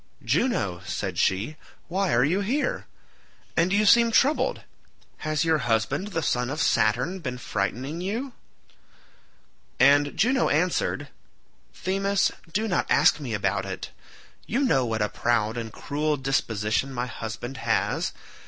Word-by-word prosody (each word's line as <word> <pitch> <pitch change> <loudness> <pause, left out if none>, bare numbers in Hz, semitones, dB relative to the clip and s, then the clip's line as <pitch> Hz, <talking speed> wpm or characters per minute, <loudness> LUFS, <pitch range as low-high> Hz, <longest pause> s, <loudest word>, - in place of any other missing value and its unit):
"Juno," 100 - 0
said - - -3
she, 105 +12 0 0.3
"why 190 +1 0
are 120 +1 +4
you 170 +8 +2
here? 285 - -1 0.7
And 170 +2 +2
you 205 +2 +3
seem 235 +2 +6
troubled—has 165 - -1
your 160 -1 +3
husband 125 - 0
the 165 -6 -3
son 125 -2 0
of 145 +3 -4
Saturn 125 - +1
been 130 -7 -4
frightening 125 - -3
you?" 235 +8 -3 1.5
And 145 +2 +4
Juno 255 +3 +3
answered, 165 +5 0 0.7
"Themis, 195 +1 +1 0.2
do 215 +6 0
not 180 - 0
ask - - +4
me 125 -7 -3
about 100 -1 0
it. 95 -8 -6 0.6
You 245 +6 0
know 135 - +2
what 110 -1 0
a - - +1
proud 110 0 0
and 115 -2 -5
cruel 150 +5 -2
disposition 125 -2 0
my 125 -1 -2
husband 120 +1 -6
has. - - 0
145 Hz, 135 wpm, -25 LUFS, 115-190 Hz, 1.5 s, seem